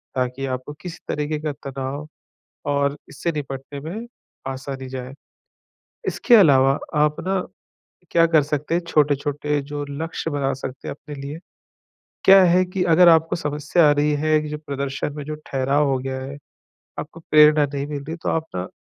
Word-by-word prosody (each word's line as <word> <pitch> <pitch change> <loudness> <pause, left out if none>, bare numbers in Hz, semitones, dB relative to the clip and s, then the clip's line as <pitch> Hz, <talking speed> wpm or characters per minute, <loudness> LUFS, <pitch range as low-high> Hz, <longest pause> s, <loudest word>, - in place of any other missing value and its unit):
ताकि 130 +1 -1
आपको 130 +2 -4
किसी 180 -2 -7
तरीक़े 150 +1 -2
का 155 -1 -2 0.2
तनाव 135 +3 -5 0.6
और 140 0 +1
इससे 165 +4 -3
निपटने 140 -1 -6
में 200 +10 -6 0.4
आसानी 130 0 -6
जाए। 130 0 -6 0.9
इसके 240 - +3
अलावा 135 -7 +5 0.2
आप 150 0 +3
ना, 190 0 0 0.7
क्या 165 0 +5
कर 160 -2 +4
सकते 150 +2 -2
हैं, 175 - +1
छोटे-छोटे 145 -1 +1
जो 145 +1 -5
लक्ष्य 160 +2 -4
बना 140 -2 0
सकते 130 0 -7
हैं - - -4
अपने 150 0 -10
लिए। 145 +3 -6 0.9
क्या 195 0 +9
है 180 +1 +4
कि 180 0 -3
अगर 180 +1 +7
आपको 165 0 +4
समस्या 150 +2 +2
आ - - +6
रही 145 +1 +2
है 155 0 +2
कि, 150 - -5
जो 150 0 -4
प्रदर्शन 140 0 -4
में 150 - -5
जो 155 +1 -4
ठहराव 135 +2 +1
हो 135 -1 +1
गया 130 0 -4
हैं, 140 +2 -7 0.6
आपको 165 - -8
प्रेरणा 150 -1 +5
नहीं 140 +1 -2
मिल 145 -2 -5
रही, 160 +3 -5
तो - - -3
आप 160 0 0
ना 90 +1 -3
145 Hz, 170 wpm, -22 LUFS, 135-155 Hz, 0.9 s, क्या